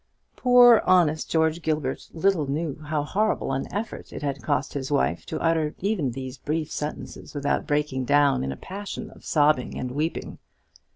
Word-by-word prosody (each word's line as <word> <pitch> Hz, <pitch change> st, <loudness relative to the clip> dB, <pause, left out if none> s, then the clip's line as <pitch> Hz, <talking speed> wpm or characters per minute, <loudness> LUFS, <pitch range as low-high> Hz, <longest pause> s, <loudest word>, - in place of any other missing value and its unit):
Poor 245 Hz, -2 st, +7 dB
honest 160 Hz, -4 st, +3 dB
George 160 Hz, +1 st, +1 dB
Gilbert 150 Hz, -4 st, -2 dB
little 170 Hz, -3 st, +1 dB
knew 150 Hz, +1 st, -2 dB
how 150 Hz, -1 st, -1 dB
horrible 200 Hz, -3 st, 0 dB
an 135 Hz, -, -3 dB
effort 215 Hz, +3 st, -5 dB
it -, -, -7 dB
had 140 Hz, -2 st, -2 dB
cost 130 Hz, +4 st, -1 dB
his 135 Hz, -2 st, -4 dB
wife 70 Hz, +6 st, 0 dB
to -, -, -3 dB
utter 160 Hz, -2 st, +1 dB
even 190 Hz, -8 st, 0 dB
these 130 Hz, +1 st, -7 dB
brief 155 Hz, 0 st, -2 dB
sentences 150 Hz, 0 st, -6 dB
without 145 Hz, 0 st, -1 dB
breaking 145 Hz, -3 st, 0 dB
down 140 Hz, -, +3 dB
in 65 Hz, -, -2 dB
a 70 Hz, -, -6 dB
passion 200 Hz, +2 st, -7 dB
of -, -, -17 dB
sobbing 150 Hz, -4 st, +2 dB
and 125 Hz, -1 st, -4 dB
weeping. 155 Hz, +5 st, -3 dB
150 Hz, 170 wpm, -25 LUFS, 135-165 Hz, -, Poor